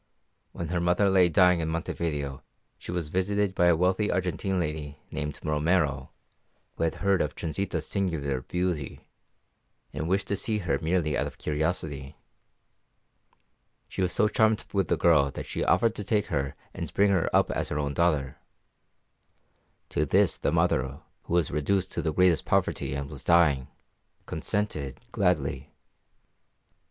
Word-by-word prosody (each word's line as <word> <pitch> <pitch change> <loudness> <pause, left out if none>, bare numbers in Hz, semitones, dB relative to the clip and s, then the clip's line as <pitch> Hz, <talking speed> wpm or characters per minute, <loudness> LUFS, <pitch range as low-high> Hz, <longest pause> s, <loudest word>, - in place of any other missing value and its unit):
When 85 - -5
her 90 0 0
mother 90 +3 +2
lay 90 -2 +5
dying 90 +2 +5
in 80 -1 -1
Montevideo 80 -4 -3 0.4
she - - -7
was 85 -4 -3
visited 100 +3 0
by 90 -2 +3
a 85 - +5
wealthy 95 +5 +1
Argentine 95 +1 -1
lady 75 -3 -3
named 75 -1 -4
Romero, 75 -3 +1 0.7
who 85 - 0
had 80 - -1
heard 100 -2 +3
of 75 - -2
Transita's 80 0 -3
singular 75 -9 -1
beauty, 90 -2 -3 0.9
and 80 +3 -3
wished 95 +2 +1
to 100 - +1
see 110 +2 -1
her 90 -5 -1
merely 80 -2 +1
out - - 0
of - - -10
curiosity. 75 -3 -2 1.7
She - - -5
was 90 -1 +1
so 105 - +3
charmed 110 0 +2
with 95 -4 +1
the - - +1
girl 75 -5 +4
that 70 - -7
she - - -3
offered 115 -1 +3
to 105 - -5
take 105 +1 +1
her 70 -2 -1 0.2
and - - -5
bring 100 0 +4
her 90 -4 +2
up - - +3
as - - -2
her 75 - -2
own 70 -1 -1
daughter. 75 -5 +1 1.5
To 75 - 0
this 95 +6 +3
the - - -1
mother, 70 -5 +1 0.2
who - - -4
was 85 -4 +2
reduced 90 +6 0
to - - -2
the 80 - -1
greatest 90 -1 +3
poverty - - 0
and 70 0 -3
was 70 -2 -8
dying, 75 -7 +4 0.6
consented 80 - -3
gladly. 70 +2 0
85 Hz, 155 wpm, -27 LUFS, 75-95 Hz, 1.7 s, lay